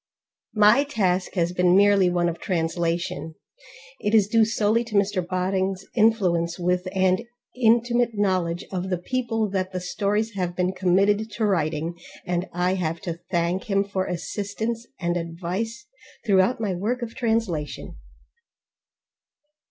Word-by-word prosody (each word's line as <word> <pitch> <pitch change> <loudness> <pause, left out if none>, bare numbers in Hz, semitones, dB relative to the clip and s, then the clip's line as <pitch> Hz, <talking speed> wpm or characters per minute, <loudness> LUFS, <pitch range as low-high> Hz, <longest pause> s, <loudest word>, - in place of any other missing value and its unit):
My 215 +6 +6
task 190 -11 -1
has 175 -1 +1
been 180 0 +3
merely 200 -2 +5
one 175 -1 +1
of 170 -1 -3
translation; 165 -2 -2 0.6
it 210 +2 +1
is 210 -3 +5
due 225 +1 +4
solely 220 +1 +1
to 225 -2 -7
Mr 200 -2 +2
Bodding's 185 +1 -1
influence 185 -7 +2
with, 180 +1 0
and 185 0 +2 0.3
intimate 240 -1 +2
knowledge 185 -3 0
of, 185 0 -3
the 180 - 0
people 225 +2 -1
that 190 -1 -2
the 185 - -2
stories 210 +4 -1
have 180 -3 -3
been 180 0 +1
committed 195 +4 +2
to 220 - 0
writing, 165 -3 -1 0.3
and 175 +1 -2
I 180 +1 0
have 165 -3 -2
to 170 -2 -5
thank 175 +3 0
him 200 -3 +1
for 195 -2 -3
assistance 205 +7 -4
and 175 -1 0
advice 180 +8 -4 0.4
throughout 200 +3 +3
my 210 -4 -1
work 225 +8 -2
of 230 -1 -6
translation. 225 - -2
190 Hz, 140 wpm, -24 LUFS, 175-215 Hz, 0.6 s, My